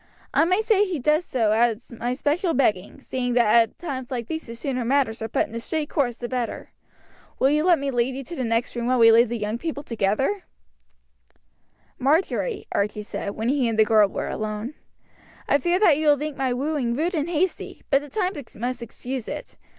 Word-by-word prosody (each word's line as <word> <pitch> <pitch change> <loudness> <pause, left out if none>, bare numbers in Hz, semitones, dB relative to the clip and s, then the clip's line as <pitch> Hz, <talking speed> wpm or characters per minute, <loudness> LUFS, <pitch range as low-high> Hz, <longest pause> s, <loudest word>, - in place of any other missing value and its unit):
I - - +4
may 370 +5 +2
say 435 -2 +3
he 375 -5 -2
does 300 +5 +2
so 225 -5 +1
at 225 0 +3
my 240 +1 -3
special 320 +6 0
begging, 215 -3 0
seeing 250 -2 -2
that 235 -3 +4
at 230 -1 +3
times 260 -7 -5
like 240 -3 -3
these 320 +3 -5
the 230 - -7
sooner 255 +1 -3
matters 250 -3 +1
are 220 - -2
put 225 - +1
in - - -15
a 230 - -3
straight 300 +5 -3
course 250 -6 0
the 240 - -5
better. 245 -2 -4 0.7
Will 270 - +3
you 300 +1 +2
let 350 -1 +5
me 275 0 -2
lead 245 +1 0
you 275 - -5
to 340 - -8
the 260 - -2
next 230 +1 -1
room 240 0 -2
while 255 0 +2
we 230 -1 +7
leave 230 +1 +5
the 235 - -2
young 215 +2 -3
people 305 -2 -4
together?" 235 - -1 1.5
"Marjory," 345 - +1
Archie 210 +1 -1
said, 200 -1 -5
when 225 +2 -1
he 270 -3 +2
and 225 -1 -1
the 220 - +6
girl 215 -1 +5
were - - -4
alone, 215 +4 -4 0.7
"I 285 - +3
fear 345 +6 +1
that 345 -8 +5
you 310 0 0
will 290 -1 +6
think 300 0 -4
my 265 -2 -1
wooing 260 -2 -1
rude 330 +7 0
and 315 -1 -1
hasty, 350 +2 -2
but 275 - +4
the 290 - -10
times 365 - -3
must 245 +2 -3
excuse 245 +1 -6
it. - - -7
255 Hz, 215 wpm, -24 LUFS, 230-305 Hz, 1.5 s, we